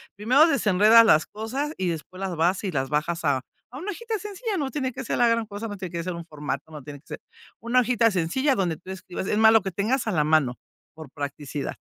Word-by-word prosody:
primero 255 Hz, +10 st, +4 dB
desenredas 225 Hz, -, +5 dB
las 155 Hz, -8 st, +4 dB
cosas 260 Hz, +8 st, -4 dB
y 185 Hz, -2 st, -1 dB
después 170 Hz, +3 st, -6 dB
las 190 Hz, -2 st, -3 dB
vas 175 Hz, +5 st, +1 dB
y 195 Hz, -, -2 dB
las 135 Hz, -3 st, -2 dB
bajas 155 Hz, +3 st, -1 dB
a 135 Hz, -2 st, +2 dB, 0.3 s
a 255 Hz, -, -9 dB
una 385 Hz, +6 st, -4 dB
hojita 450 Hz, +2 st, -4 dB
sencilla, 420 Hz, +2 st, -4 dB
no 285 Hz, -5 st, -2 dB
tiene 265 Hz, -4 st, -2 dB
que 265 Hz, +2 st, -6 dB
ser -, -, -2 dB
la 240 Hz, -, +4 dB
gran 230 Hz, -1 st, +1 dB
cosa, 205 Hz, +2 st, -6 dB
no 205 Hz, -, -7 dB
tiene 185 Hz, -3 st, -6 dB
que 170 Hz, -1 st, -4 dB
ser 180 Hz, -, -3 dB
un 170 Hz, 0 st, -7 dB
formato, 150 Hz, -1 st, -5 dB
no 150 Hz, -3 st, -9 dB
tiene 145 Hz, +1 st, -9 dB
que -, -, -35 dB
ser -, -, -8 dB, 0.4 s
una 235 Hz, +4 st, +2 dB
hojita 235 Hz, -1 st, +2 dB
sencilla 205 Hz, -, +1 dB
donde 175 Hz, -5 st, -1 dB
tú 185 Hz, -, -10 dB
escribas, 190 Hz, -1 st, -6 dB
es 210 Hz, -, 0 dB
más 220 Hz, 0 st, +7 dB
lo 225 Hz, -, +5 dB
que 190 Hz, -, -3 dB
tengas 220 Hz, +8 st, -1 dB
a -, -, +1 dB
la 155 Hz, -6 st, +2 dB
mano, 150 Hz, -5 st, +2 dB, 0.4 s
por 155 Hz, -4 st, -10 dB
practicidad. 145 Hz, 0 st, -5 dB
195 Hz, 245 wpm, -25 LUFS, 160-240 Hz, 0.4 s, más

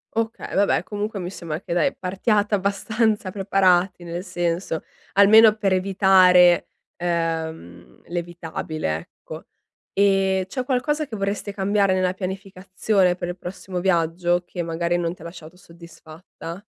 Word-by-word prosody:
Okay, 225 Hz, 0 st, -3 dB
vabbè 200 Hz, +1 st, +2 dB
comunque 210 Hz, 0 st, -4 dB
mi 180 Hz, 0 st, -5 dB
sembra 165 Hz, -5 st, -5 dB
che 175 Hz, -, -5 dB
dai, 170 Hz, -3 st, +1 dB
partiate 205 Hz, +3 st, 0 dB
abbastanza 205 Hz, +1 st, 0 dB
preparati 190 Hz, -2 st, +2 dB
nel 170 Hz, +1 st, -5 dB
senso, 175 Hz, -2 st, -2 dB, 0.3 s
almeno 215 Hz, +2 st, +7 dB
per 200 Hz, -3 st, 0 dB
evitare, 185 Hz, -2 st, +5 dB, 0.3 s
ehm, 165 Hz, -, -4 dB
l'evitabile 170 Hz, -, -4 dB
ecco. 80 Hz, -, -11 dB, 0.5 s
Ehm, 195 Hz, -1 st, +2 dB
c'è 255 Hz, +7 st, -4 dB
qualcosa 295 Hz, +4 st, -1 dB
che 225 Hz, -, -7 dB
vorreste 200 Hz, 0 st, -3 dB
cambiare 200 Hz, 0 st, +1 dB
nella 185 Hz, -1 st, +1 dB
pianificazione 190 Hz, 0 st, -1 dB
per 175 Hz, -1 st, -5 dB
il 175 Hz, -, -5 dB
prossimo 180 Hz, 0 st, -6 dB
viaggio 175 Hz, 0 st, +1 dB
che 175 Hz, -, -5 dB
magari 170 Hz, +1 st, -1 dB
non 170 Hz, 0 st, -2 dB
ti -, -, -20 dB
ha -, -, -10 dB
lasciato 170 Hz, 0 st, -11 dB
soddisfatta? 170 Hz, +1 st, -12 dB
185 Hz, 130 wpm, -22 LUFS, 170-200 Hz, 0.5 s, almeno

